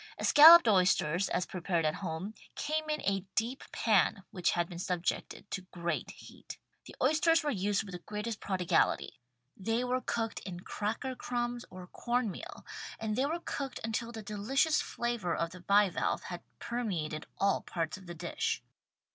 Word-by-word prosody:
Escalloped 325 Hz, 0 st, +9 dB
oysters, 185 Hz, -3 st, +3 dB
as 180 Hz, -, 0 dB
prepared 175 Hz, -2 st, -1 dB
at 155 Hz, -, +2 dB
home, 180 Hz, +3 st, -4 dB
' -, -, -27 dB
came 310 Hz, +1 st, -1 dB
in 305 Hz, 0 st, -1 dB
a 195 Hz, -1 st, 0 dB
deep 240 Hz, +4 st, -1 dB
pan 200 Hz, -3 st, +2 dB
vrhich 180 Hz, -3 st, +1 dB
had 175 Hz, -1 st, 0 dB
been 170 Hz, -1 st, -8 dB
subjected 180 Hz, +1 st, -2 dB
to 190 Hz, -, -2 dB
great 170 Hz, -1 st, -3 dB
heat. -, -, -11 dB, 0.3 s
The -, -, -11 dB
oysters 325 Hz, +1 st, +3 dB
were 295 Hz, -, 0 dB
used 205 Hz, -1 st, 0 dB
with 200 Hz, -, -9 dB
the 180 Hz, -, -6 dB
greatest 210 Hz, +4 st, -5 dB
prodigality. 185 Hz, -3 st, +1 dB, 0.4 s
They 225 Hz, +5 st, -1 dB
were 250 Hz, +1 st, 0 dB
cooked 225 Hz, -3 st, -2 dB
in 175 Hz, -2 st, -7 dB
cracker 225 Hz, +8 st, -3 dB
crumbs 245 Hz, -1 st, -3 dB
or 185 Hz, 0 st, -9 dB
corn 240 Hz, +3 st, -1 dB
meal -, -, -9 dB, 0.3 s
and 220 Hz, -1 st, -2 dB
they 265 Hz, +4 st, +1 dB
were 335 Hz, +3 st, -2 dB
cooked 275 Hz, -2 st, -4 dB
until 225 Hz, +1 st, -2 dB
the 220 Hz, -2 st, -7 dB
delicious 270 Hz, +10 st, +1 dB
flavor 235 Hz, -, -2 dB
of 165 Hz, 0 st, -1 dB
the 180 Hz, -, -10 dB
bivalve 200 Hz, 0 st, +2 dB
had 175 Hz, -1 st, -6 dB, 0.2 s
permeated 175 Hz, -11 st, -3 dB
all 200 Hz, 0 st, +2 dB
parts 165 Hz, -3 st, -3 dB
of 190 Hz, -1 st, -13 dB
the 175 Hz, -, -7 dB
dish. 455 Hz, -, -2 dB
210 Hz, 170 wpm, -32 LUFS, 180-245 Hz, 0.4 s, Escalloped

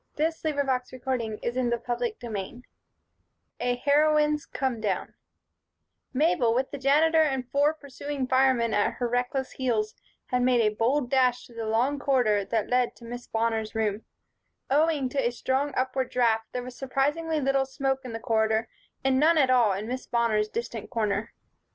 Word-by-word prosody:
CHAPTER 285 Hz, -5 st, -1 dB
XIII 240 Hz, -2 st, -3 dB, 1.0 s
A 245 Hz, 0 st, 0 dB
Heroine's 300 Hz, +2 st, +2 dB
Come 260 Hz, -5 st, -2 dB
Down 200 Hz, -4 st, -2 dB, 1.0 s
MABEL, 255 Hz, -5 st, +2 dB
with 260 Hz, +2 st, 0 dB
the 285 Hz, -, -6 dB
Janitor 310 Hz, +4 st, +4 dB
and 265 Hz, -5 st, 0 dB
four 290 Hz, +2 st, +3 dB
pursuing 285 Hz, -1 st, -5 dB
firemen 260 Hz, -3 st, +3 dB
at 205 Hz, -, +2 dB
her 245 Hz, -, -2 dB
reckless 245 Hz, +2 st, -1 dB
heels, 225 Hz, -5 st, -1 dB, 0.4 s
had 250 Hz, 0 st, +2 dB
made 250 Hz, -1 st, +3 dB
a 210 Hz, -1 st, +2 dB
bold 245 Hz, +4 st, 0 dB
dash 250 Hz, -2 st, +2 dB
through 235 Hz, -, -16 dB
the 225 Hz, -1 st, -3 dB
long 250 Hz, +6 st, +1 dB
corridor 245 Hz, -8 st, +2 dB
that 220 Hz, +1 st, -1 dB
led 250 Hz, -1 st, +1 dB
to 235 Hz, -, -14 dB
Miss 245 Hz, +1 st, -7 dB
Bonner's 225 Hz, -1 st, -1 dB
room. 215 Hz, -1 st, -1 dB, 0.7 s
Owing 300 Hz, -1 st, +3 dB
to 275 Hz, +1 st, -1 dB
a 240 Hz, -, +2 dB
strong 265 Hz, +4 st, -1 dB
upward 260 Hz, 0 st, 0 dB
draft, 225 Hz, -3 st, +1 dB
there 250 Hz, -, -4 dB
was 250 Hz, 0 st, -9 dB
surprisingly 295 Hz, +5 st, -1 dB
little 270 Hz, -1 st, +1 dB
smoke 270 Hz, 0 st, -1 dB
in 250 Hz, -, -7 dB
this 225 Hz, 0 st, -6 dB
corridor 220 Hz, 0 st, +1 dB, 0.3 s
and 265 Hz, -1 st, +2 dB
none 320 Hz, +3 st, +4 dB
at 265 Hz, -4 st, +4 dB
all 240 Hz, -5 st, +4 dB
in 200 Hz, +3 st, -4 dB
Miss 255 Hz, +2 st, -5 dB
Bonner's 220 Hz, -3 st, +1 dB
distant 230 Hz, -2 st, -5 dB
corner. 215 Hz, -2 st, -2 dB
250 Hz, 155 wpm, -27 LUFS, 230-275 Hz, 1.0 s, Janitor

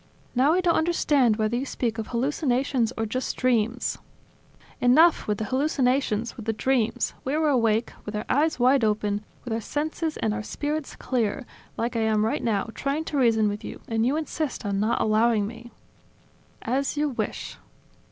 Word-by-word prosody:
Now 265 Hz, +5 st, +4 dB
I 365 Hz, -, +2 dB
don't 350 Hz, -2 st, +3 dB
understand 295 Hz, -8 st, +3 dB
whether 215 Hz, +1 st, 0 dB
you 250 Hz, -, -1 dB
speak 235 Hz, -4 st, -2 dB
of 220 Hz, -, -4 dB
hallucinations 255 Hz, -1 st, 0 dB
or 225 Hz, -, 0 dB
just 255 Hz, +4 st, -3 dB
dreams 240 Hz, -1 st, 0 dB, 0.4 s
..." -, -, -28 dB
"Enough 310 Hz, +7 st, +5 dB
with 210 Hz, -1 st, 0 dB
the 220 Hz, -, -3 dB
hallucinations, 260 Hz, -3 st, 0 dB
with 225 Hz, -2 st, -9 dB
the 225 Hz, -, +1 dB
dreams! 240 Hz, 0 st, 0 dB
We 275 Hz, +3 st, -1 dB
were 310 Hz, -1 st, +2 dB
awake, 230 Hz, -4 st, +2 dB
with 210 Hz, -, -6 dB
our 210 Hz, -, -3 dB
eyes 300 Hz, +1 st, +1 dB
wide 255 Hz, +1 st, +4 dB
open, 210 Hz, -1 st, 0 dB, 0.2 s
with 245 Hz, -, -4 dB
our 225 Hz, -, -1 dB
senses 310 Hz, +5 st, -2 dB
and 215 Hz, -, 0 dB
our 220 Hz, -, -3 dB
spirits 295 Hz, +6 st, -4 dB
clear, 245 Hz, 0 st, -1 dB, 0.3 s
like 235 Hz, +1 st, -2 dB
I -, -, +1 dB
am 220 Hz, -1 st, +2 dB
right 225 Hz, -, -1 dB
now, 220 Hz, -1 st, 0 dB
trying 280 Hz, +3 st, -2 dB
to 295 Hz, -, -3 dB
reason 225 Hz, -4 st, +4 dB
with 205 Hz, 0 st, -3 dB
you, -, -, -7 dB
and 225 Hz, -1 st, 0 dB
you 265 Hz, +6 st, +2 dB
insist 310 Hz, -5 st, -3 dB
on 200 Hz, -1 st, -1 dB
not 215 Hz, +3 st, +1 dB
allowing 215 Hz, 0 st, +3 dB
me." 235 Hz, +2 st, -9 dB, 0.9 s
"As 270 Hz, +5 st, -1 dB
you 300 Hz, 0 st, +1 dB
wish." 255 Hz, -, -4 dB
240 Hz, 180 wpm, -25 LUFS, 220-280 Hz, 0.9 s, Enough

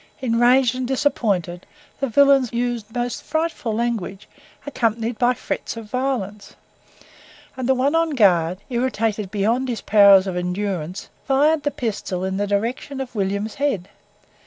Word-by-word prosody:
Enraged 245 Hz, 0 st, +3 dB
and 255 Hz, -1 st, -3 dB
disappointed, 200 Hz, -, -1 dB, 0.3 s
the 275 Hz, -, 0 dB
villains 275 Hz, 0 st, +4 dB
used 235 Hz, -2 st, -2 dB
most 245 Hz, 0 st, -2 dB
frightful 315 Hz, -6 st, -2 dB
language, 215 Hz, -3 st, -3 dB, 0.4 s
accompanied 230 Hz, -4 st, -1 dB
by 245 Hz, 0 st, +4 dB
threats 230 Hz, -, -5 dB
of 225 Hz, -, -7 dB
violence; 245 Hz, -6 st, -3 dB, 1.0 s
and 260 Hz, -1 st, -3 dB
the 265 Hz, -, +4 dB
one 270 Hz, +3 st, +1 dB
on 330 Hz, 0 st, +2 dB
guard, 185 Hz, -, +3 dB
irritated 225 Hz, -5 st, -1 dB
beyond 225 Hz, +6 st, 0 dB
his 230 Hz, -4 st, -3 dB
powers 200 Hz, -2 st, +6 dB
of 190 Hz, -2 st, -3 dB
endurance, 180 Hz, -1 st, -3 dB, 0.2 s
fired 295 Hz, +3 st, +3 dB
the 290 Hz, -, 0 dB
pistol 205 Hz, -8 st, -4 dB
in 190 Hz, 0 st, -2 dB
the 205 Hz, 0 st, -1 dB
direction 230 Hz, +7 st, -2 dB
of 265 Hz, -2 st, -5 dB
William's 200 Hz, +1 st, -2 dB
head. 205 Hz, -11 st, -1 dB
230 Hz, 140 wpm, -21 LUFS, 200-260 Hz, 1.0 s, powers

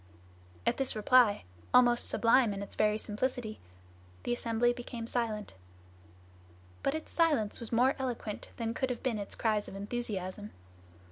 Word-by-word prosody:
At -, -, +2 dB
this 270 Hz, -3 st, +1 dB
reply, 220 Hz, 0 st, +4 dB, 0.3 s
almost 240 Hz, -1 st, +5 dB
sublime 230 Hz, -2 st, +4 dB
in 200 Hz, -, -4 dB
its 200 Hz, -, -9 dB
very 210 Hz, 0 st, +2 dB
simplicity, 220 Hz, +1 st, -3 dB, 0.6 s
the 240 Hz, -, 0 dB
assembly 240 Hz, 0 st, +1 dB
became 240 Hz, -1 st, -6 dB
silent. 225 Hz, -3 st, -2 dB, 1.3 s
But 275 Hz, -, 0 dB
its 315 Hz, -, -6 dB
silence 295 Hz, -11 st, +2 dB
was 235 Hz, -, -8 dB
more 250 Hz, +3 st, +4 dB
eloquent 240 Hz, -5 st, -4 dB
than 230 Hz, -1 st, -2 dB
could 260 Hz, +1 st, -1 dB
have 250 Hz, -, -4 dB
been 240 Hz, -5 st, 0 dB
its 200 Hz, -, -5 dB
cries 215 Hz, -2 st, +1 dB
of -, -, -8 dB
enthusiasm. 205 Hz, -2 st, -4 dB
230 Hz, 145 wpm, -31 LUFS, 210-250 Hz, 1.3 s, almost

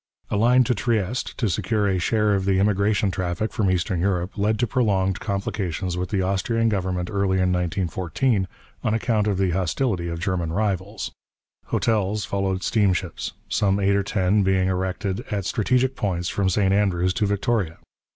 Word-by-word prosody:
A -, -, +1 dB
line 120 Hz, +4 st, +5 dB
to 125 Hz, -, +1 dB
Trieste, 115 Hz, 0 st, -1 dB
to 120 Hz, -, 0 dB
secure 105 Hz, +3 st, 0 dB
a 95 Hz, -2 st, +1 dB
share 105 Hz, +3 st, +2 dB
of 95 Hz, -1 st, 0 dB
the 95 Hz, -1 st, +2 dB
immigration 100 Hz, 0 st, +2 dB
traffic 90 Hz, +4 st, -2 dB
from 110 Hz, -4 st, +1 dB
Eastern 90 Hz, 0 st, 0 dB
Europe, 90 Hz, -1 st, -1 dB
led 105 Hz, +1 st, +1 dB
to 120 Hz, -, +1 dB
prolonged 100 Hz, -6 st, +1 dB
complications 95 Hz, -3 st, -2 dB
with 90 Hz, 0 st, -3 dB
the 95 Hz, -3 st, 0 dB
Austrian 115 Hz, +5 st, +1 dB
government 95 Hz, -3 st, -1 dB
early 100 Hz, -2 st, +1 dB
in 90 Hz, -1 st, +2 dB
1914, 90 Hz, -, 0 dB, 0.4 s
on 110 Hz, -, +1 dB
account 110 Hz, -2 st, +1 dB
of 100 Hz, -3 st, +1 dB
the 95 Hz, -2 st, +1 dB
hostility 90 Hz, -, 0 dB
of 85 Hz, -1 st, -4 dB
German 85 Hz, -3 st, -1 dB
rivals. 100 Hz, 0 st, -2 dB, 0.6 s
Hotels 105 Hz, -2 st, 0 dB
followed 95 Hz, -1 st, -1 dB
steamships, 95 Hz, -5 st, 0 dB
some 100 Hz, -1 st, +1 dB
eight 100 Hz, 0 st, +2 dB
or 100 Hz, -, +2 dB
ten 100 Hz, 0 st, +1 dB
being 95 Hz, -1 st, +2 dB
erected 95 Hz, +3 st, -2 dB
at 100 Hz, -3 st, -2 dB
strategic 125 Hz, +5 st, +1 dB
points 90 Hz, -6 st, -1 dB
from 100 Hz, -2 st, 0 dB
St 95 Hz, 0 st, +2 dB
Andrews 90 Hz, -3 st, +2 dB
to 105 Hz, 0 st, 0 dB
Victoria. 100 Hz, -4 st, 0 dB
100 Hz, 170 wpm, -23 LUFS, 95-105 Hz, 0.6 s, line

